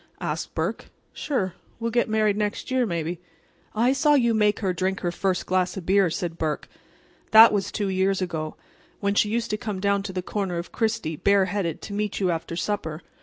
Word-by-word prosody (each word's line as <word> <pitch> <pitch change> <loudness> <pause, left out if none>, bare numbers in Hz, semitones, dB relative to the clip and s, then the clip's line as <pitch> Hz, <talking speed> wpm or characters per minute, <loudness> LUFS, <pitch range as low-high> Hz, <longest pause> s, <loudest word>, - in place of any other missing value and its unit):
asked - - -4
Burke. - - -2 0.3
"Sure. 195 - -2 0.3
We'll 230 0 -2
get 240 -1 +1
married 215 -1 +2
next 210 +4 -2
year, 255 -2 +2
maybe." 170 -1 -3 0.6
"I 240 +4 +3
saw 295 +2 +4
you 235 -4 +3
make 210 -1 +2
her 190 -3 0
drink 190 +2 -1
her 175 - -1
first 185 0 -1
glass 185 0 0
of 185 - -6
beer," 195 -1 +4
said 165 0 -4
Burke. 155 -2 -2 0.6
"That 220 0 +9
was 200 -1 -1
two 205 -3 -1
years 190 +1 +1
ago, 160 -4 -3 0.4
when 200 -1 0
she 205 +1 +3
used 230 +1 -1
to 210 - 0
come 210 -2 -4
down 200 +1 +1
to 195 -1 -5
the 185 -1 -3
corner 190 -3 -2
of 170 - -5
Chrystie 220 -9 -1
bare 200 -1 +5
headed 180 -4 -3
to 205 - -6
meet 210 0 -2
you 185 -3 +2
after 165 0 -4
supper. 170 -4 -3
200 Hz, 205 wpm, -25 LUFS, 180-215 Hz, 0.6 s, That